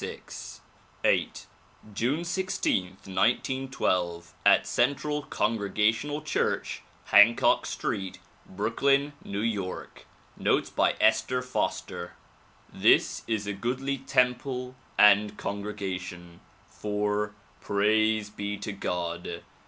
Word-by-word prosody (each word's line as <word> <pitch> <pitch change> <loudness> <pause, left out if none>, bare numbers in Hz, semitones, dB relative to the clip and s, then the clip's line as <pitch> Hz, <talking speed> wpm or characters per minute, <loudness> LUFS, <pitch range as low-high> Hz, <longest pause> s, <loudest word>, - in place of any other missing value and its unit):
VIII - - +3 0.6
June 130 +10 0
16, 185 - 0 0.2
1912, 95 -4 0
at - - +5
Central 145 +4 0
Congregational 115 +6 0
Church, 155 - -1 0.2
Hancock 105 +3 +5
Street, 95 -1 -3 0.3
Brooklyn, 135 +8 +1
N. - - -10 0.3
Y. 90 -1 -5 0.5
Notes - - +1
by - - +2
Esther 125 0 +2
Foster 125 - -3 0.6
THIS - - +3
is 110 -2 -1
a 105 - -2
goodly 130 +7 -2
temple 125 0 0 0.2
and 105 0 +6
congregation, 90 -4 -5 0.3
for 105 0 -2
— - - -31
Praise 110 +1 +2
be 100 0 -4
to 105 +1 -5
God 85 -3 -4
105 Hz, 90 wpm, -28 LUFS, 100-125 Hz, 0.6 s, and